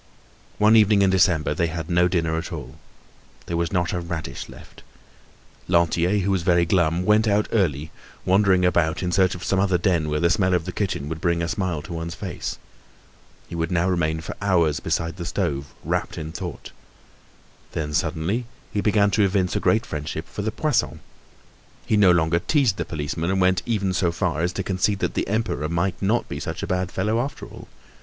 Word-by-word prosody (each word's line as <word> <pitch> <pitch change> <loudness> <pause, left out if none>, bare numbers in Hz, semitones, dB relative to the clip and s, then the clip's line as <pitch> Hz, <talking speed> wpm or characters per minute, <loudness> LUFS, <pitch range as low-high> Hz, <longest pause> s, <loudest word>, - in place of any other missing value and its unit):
One 105 +1 +5
evening 105 -2 +5
in 95 - +3
December 90 -5 +3
they 85 +3 0
had 80 -1 -5
no 90 0 +3
dinner 80 -3 0
at 80 +3 -4
all. 75 -3 -7 0.7
There 85 - -3
was 85 -1 -1
not 90 -2 0
a 90 - -1
radish 85 -6 -5
left. - - -14 0.9
Lantier, 85 +2 +2
who 100 +1 0
was 95 -2 +1
very 85 0 +3
glum, 85 0 +1
went 105 +2 +4
out 105 0 +2
early, 80 -8 0 0.3
wandering 95 -1 +4
about 85 -1 +1
in 90 - -1
search 95 0 +3
of 90 - -8
some 95 - +1
other 95 -2 +2
den 85 -3 +1
where 75 0 0
the 85 +1 +2
smell 95 -2 +2
of 85 -2 -1
the 90 - -4
kitchen 90 -8 -2
would 80 +1 -5
bring 85 -1 +1
a - - -1
smile 90 -6 -2
to 85 - -8
one's 85 0 -5
face. 95 -5 -5 0.9
He - - -11
would 85 +1 -2
now 90 0 +2
remain 80 -3 0
for 80 - -7
hours 85 -7 +2
beside 85 +2 -2
the 85 - -5
stove 70 0 -2
wrapt - - -2
in 80 0 -5
thought. 90 0 -7 1.0
Then, 75 -1 -3
suddenly, 95 +12 -1 0.3
he 105 - 0
began 105 -1 +3
to 105 - +3
evince 95 -2 +1
a - - +1
great 110 +2 +2
friendship 80 +2 -5
for - - -6
the 110 +2 -1
Poissons. 150 +2 0 0.9
He - - +1
no 105 -3 +6
longer 85 -1 +3
teased 125 - +1
the - - -2
policeman 80 +2 -3
and 95 0 +3
even 105 -5 0
went 95 - -1
so 90 -3 +1
far 85 -2 -1
as 85 +1 +1
to 95 - -3
concede 95 +2 0
that - - -2
the - - -1
Emperor 105 - -1
might 85 +2 -1
not 105 +5 +1
be 70 - -5
such - - -5
a - - 0
bad 90 0 -1
fellow 105 +4 0
after 135 +4 -4
all. - - -12
90 Hz, 205 wpm, -23 LUFS, 80-100 Hz, 1.0 s, no